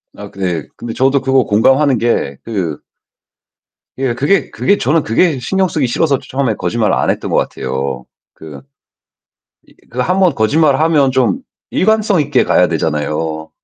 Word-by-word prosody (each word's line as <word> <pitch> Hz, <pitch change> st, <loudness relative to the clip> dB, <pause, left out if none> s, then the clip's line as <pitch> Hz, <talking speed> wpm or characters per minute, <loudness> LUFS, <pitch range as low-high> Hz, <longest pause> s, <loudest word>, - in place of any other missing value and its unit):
아 -, -, -9 dB
그 100 Hz, -, -16 dB
네. 85 Hz, -5 st, -2 dB
근데 115 Hz, -1 st, -6 dB
저도 135 Hz, +1 st, +2 dB
그거 135 Hz, -1 st, +2 dB
공감하는 130 Hz, +6 st, +3 dB
게 105 Hz, -, -1 dB
그 95 Hz, -9 st, -3 dB, 1.2 s
예. 130 Hz, -3 st, -1 dB
그게, 150 Hz, +10 st, +1 dB
그게 200 Hz, +1 st, +1 dB
저는 155 Hz, +2 st, +1 dB
그게 145 Hz, +6 st, +1 dB
신경 190 Hz, +9 st, 0 dB
쓰기 150 Hz, -5 st, -1 dB
싫어서 140 Hz, +2 st, +1 dB
처음에 130 Hz, -5 st, -2 dB
거짓말을 115 Hz, -2 st, 0 dB
안 -, -, 0 dB
했던 -, -, -2 dB
것 -, -, +2 dB
같아요. 65 Hz, -1 st, -3 dB, 0.3 s
그 75 Hz, -4 st, -11 dB, 1.1 s
이 -, -, -22 dB, 0.2 s
그 125 Hz, -, -7 dB
1 180 Hz, +9 st, +1 dB
번 175 Hz, -6 st, +4 dB
거짓말 140 Hz, +5 st, +2 dB
하면 150 Hz, -4 st, +3 dB
좀 125 Hz, -7 st, +1 dB, 0.3 s
일관성 210 Hz, -3 st, +2 dB
있게 145 Hz, -3 st, +1 dB
가야 -, -, +3 dB
되잖아요. 80 Hz, +1 st, -2 dB
130 Hz, 290 characters per minute, -15 LUFS, 95-150 Hz, 1.2 s, 번